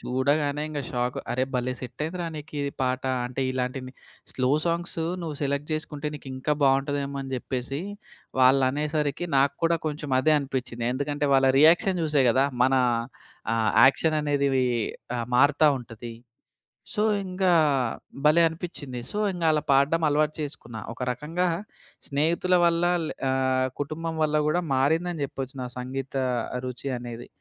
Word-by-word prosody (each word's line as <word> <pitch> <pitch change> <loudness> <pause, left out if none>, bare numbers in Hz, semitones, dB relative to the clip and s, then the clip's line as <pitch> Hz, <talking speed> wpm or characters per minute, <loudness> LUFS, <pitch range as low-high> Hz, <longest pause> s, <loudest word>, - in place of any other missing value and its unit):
చూడగానే 145 +3 0
ఇంగ 150 -2 -3
షాకు. 125 0 -2
"అరె! 130 +1 +1
భలే 125 0 0
సెట్ 125 +2 -6
అయిందిరా! 170 +1 -3
నీకిది 145 -2 -4
పాట. 130 0 0 0.2
అంటే 125 +2 -5
ఇలాంటి 130 +1 -2 0.5
స్లో 130 0 0
సాంగ్సు, 170 -1 -1 0.2
నువ్వు 155 -3 -4
సెలెక్ట్ 140 +2 -1
జేసుకుంటే 150 -1 -3
నీకింకా 135 +1 -3
బావుంటదేమో" 140 +1 +1
అని 135 0 -7
జెప్పేసి 130 +2 -3 0.6
వాళ్ళనేసరికి 145 +4 +2
నాకు 140 +1 +3
కూడా 165 0 +3
కొంచెం 150 -2 -4
అదే 155 +3 +4
అనిపిచ్చింది. 130 -4 -4
ఎందుకంటే 145 +1 -1
వాళ్ళ 135 0 +5
రియాక్షన్ 170 +3 +5
జుసే 150 -3 +3
కదా! 130 +3 +3 0.2
మన 130 +1 +3 0.8
ఆహ్, 110 -1 +2 0.2
యాక్షన్ 155 +3 +3
అనేదివి 140 -3 +1 0.5
ఆహ్, 115 - -3
మారుతా 145 +3 +5
ఉంటది. 115 -1 -9 0.8
సో 210 -2 0 0.2
ఇంకా 185 0 +1 0.7
భలే 155 +3 +6
అనిపిచ్చింది. 160 -6 -6
సో 210 - -2
ఇంగా 170 -2 -1
అలా 150 - +1
పాడడం 140 +5 +3
అలవాటు 150 +1 +2
చేసుకున్నా. 120 -6 -6
ఒక 115 - -11
రకంగా 160 +8 -2 0.6
స్నేహితుల 165 +5 +1
వల్ల 170 0 +2 0.2
లే - - -4 0.2
ఆహ్, 130 0 +1
కుటుంబం 160 +3 -3
వల్ల 150 0 +2
కూడా 175 +4 +2
మారిందని 160 +4 +1
చెప్పొచ్చు 135 0 -7
నా 125 - -3
సంగీత 130 +2 -5 0.5
రుచి 125 +2 -5
అనేది. 120 0 -8
140 Hz, 140 wpm, -26 LUFS, 130-155 Hz, 0.8 s, భలే